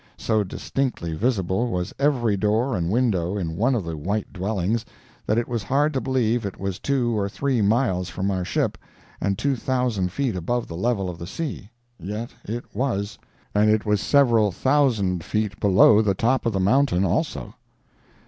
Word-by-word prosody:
So 110 -2 +1
distinctly 100 -3 -3
visible 100 +1 0
was 90 -4 -3
every 125 -7 +2
door 110 +5 +1
and 85 -2 -1
window 100 -5 +1
in 80 -4 -3
one 120 +8 +2
of 110 - -1
the 85 -1 -4
white 100 +8 -3
dwellings, 100 +3 -1 0.4
that 110 - +2
it 120 - 0
was 120 -2 -2
hard 145 +8 +1
to 130 - 0
believe 120 -3 +1
it 100 -2 -5
was 95 -1 -3
two 125 -4 0
or 100 -1 0
three 130 +1 0
miles 100 -4 +1
from 95 +3 -2
our 95 -2 -1
ship - - -1 0.4
and 100 -1 0
two 140 +4 +1
thousand 120 -7 -1
feet 130 -1 -1
above 120 +8 -2
the 85 - -7
level 100 0 0
of 85 -2 -6
the 85 - -6
sea. 140 - -5 0.3
Yet 105 +7 -5
it 115 +3 -5
was—and 105 -3 -1
it 110 0 +2
was 105 -2 +1
several 115 -7 +4
thousand 110 - +1
feet 105 -2 -2
below 105 +2 +6
the 100 -3 +1
top 120 +4 +1
of 115 - 0
the 95 - 0
mountain, 100 -1 +3
also. 90 - -1
105 Hz, 175 wpm, -24 LUFS, 95-125 Hz, 0.4 s, below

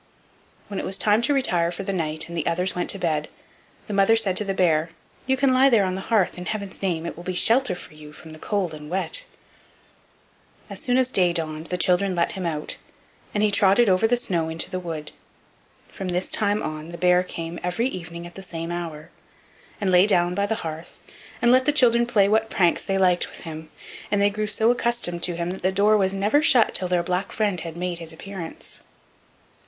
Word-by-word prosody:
When 200 - -5
it - - -4
was 190 - -1
time 210 +1 +3
to 235 - 0
retire 175 -10 +2
for 175 +3 -6
the 195 - -3
night, 155 -3 -2
and 170 - -8
the 160 - -2
others 180 +2 0
went 180 - -3
to - - +1
bed, 155 -4 -1 0.6
the 210 - -6
mother 195 +3 +4
said 205 -5 +1
to - - +3
the 195 -1 -3
bear: 165 -3 +2 0.4
"You 265 0 +2
can 265 0 +3
lie 265 +2 +5
there 220 -6 +4
on 185 - -2
the 190 - -4
hearth, 195 -4 +1
in 180 - -7
heaven's 200 -3 -5
name; 170 -4 -1
it - - -5
will 175 - -10
be 185 0 -4
shelter 235 +1 +3
for 175 - -10
you 150 -1 -12
from 160 +1 -13
the 155 - -11
cold 195 -4 -2
and 150 -1 -9
wet." 345 - -1 1.5
As - - -6
soon 250 -1 +1
as 260 -1 +2
day 180 -5 +3
dawned 155 -1 -3
the 180 - -2
children 185 +1 +2
led 170 -1 +1
him 185 -3 -4
out, 150 -2 -4 0.6
and 210 - +2
he 210 - +3
trotted 200 +3 +4
over 185 +4 +3
the 245 +2 +2
snow 170 -8 -1
into 160 0 -2
the 185 - -2
wood. 160 -4 -6 0.8
From 190 - -7
this 180 +1 -2
time 205 0 0
on 155 +1 -5
the 170 - -8
bear 180 +1 +4
came 170 -2 -6
every 180 +7 -1
evening 170 -7 -5
at 175 - -10
the 195 - -9
same 170 -2 -6
hour, 165 -3 -6 0.7
and 195 -3 0
lay 180 +2 +6
down 175 -3 +2
by 200 +2 0
the 220 - 0
hearth 160 +2 -8 0.4
and 240 - +5
let 255 +1 +4
the 295 - +4
children 240 -4 +3
play 210 -5 +3
what 220 +2 +1
pranks 175 -3 +2
they 195 -1 -1
liked 180 -2 +2
with - - -8
him; 160 -1 -8 0.4
and 205 - +1
they 200 0 +3
got 210 0 -3
so 220 +2 +3
accustomed 235 -8 -1
to 175 0 0
him 170 +1 -3
that 190 - -7
the 185 - +1
door 205 +3 +3
was 190 -2 +2
never 205 +9 +2
shut 250 -6 +4
till 185 - +1
their 180 -1 +1
black 180 +2 -2
friend 205 -5 0
had 165 -1 -7
made 175 -1 -3
his 165 -1 -5
appearance. 175 0 -9
185 Hz, 225 wpm, -23 LUFS, 170-210 Hz, 1.5 s, lay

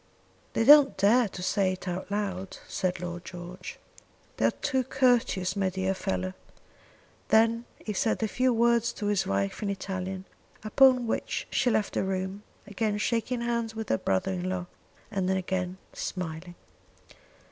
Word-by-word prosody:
"They - - +2
don't 285 +2 +8
dare 220 +5 +4
to 180 -2 -8
say 190 0 +1
it 185 +1 -9
out 180 +2 -4
loud," 195 -2 -3
said 185 -1 -1
Lord 175 0 -5
George. 180 +1 -8 0.6
"They - - +2
are - - +6
too 265 -3 -1
courteous, 245 -8 +2
my 195 -1 +1
dear 190 +1 -1
fellow." 95 - -2 0.9
Then 230 +2 +3
he 210 - -5
said 220 +3 0
a - - +2
few 255 +4 +1
words 235 0 +3
to 210 - -5
his 205 -1 +1
wife 100 0 -1
in 205 - -1
Italian, 190 -1 -4 0.4
upon 255 +3 +5
which 225 - -2
she 255 - +2
left 215 -3 0
the - - 0
room, 190 +1 -3 0.2
again 205 +1 -1
shaking 235 +3 -1
hands 235 -1 -1
with 220 -1 -5
her 110 - +2
brother 95 - 0
in 185 0 -2
law, 185 -1 -2 0.5
and 190 -3 -1
again 185 -1 -1 0.2
smiling. 175 0 -5
195 Hz, 160 wpm, -28 LUFS, 185-230 Hz, 0.9 s, don't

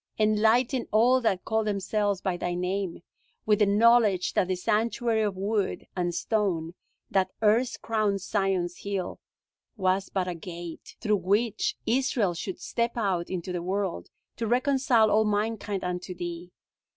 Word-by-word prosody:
Enlighten 220 +4 +2
all 245 +4 +4
that 195 -6 0
call 220 0 +1
themselves 205 -1 -1
by 190 -3 -1
Thy 175 0 -2
name 180 -1 -2 0.4
with 210 -1 +3
the 210 - +4
knowledge 210 -2 +4
that 180 - +2
the 185 - 0
sanctuary 220 +4 0
of 205 -3 -1
wood 200 0 -1
and 175 -2 -1
stone, 180 -6 -1 0.4
that 190 -1 +2
erst 230 +4 +2
crowned 215 -3 0
Zion's 190 -3 -1
hill, 200 -3 -4 0.6
was 190 0 +1
but 185 -2 -1
a 180 - -2
gate, 170 0 -9
through 210 -2 +2
which 210 - 0
Israel 235 -6 +1
should 180 +2 -5
step 235 +6 -2
out 190 -6 0
into 185 -1 -4
the 175 - -2
world, 185 - -2 0.3
to 230 - -2
reconcile 250 -2 +3
all 215 +1 +4
mankind 210 -1 -1
unto 180 0 -4
Thee! 175 0 -6
200 Hz, 150 wpm, -27 LUFS, 180-220 Hz, 0.6 s, all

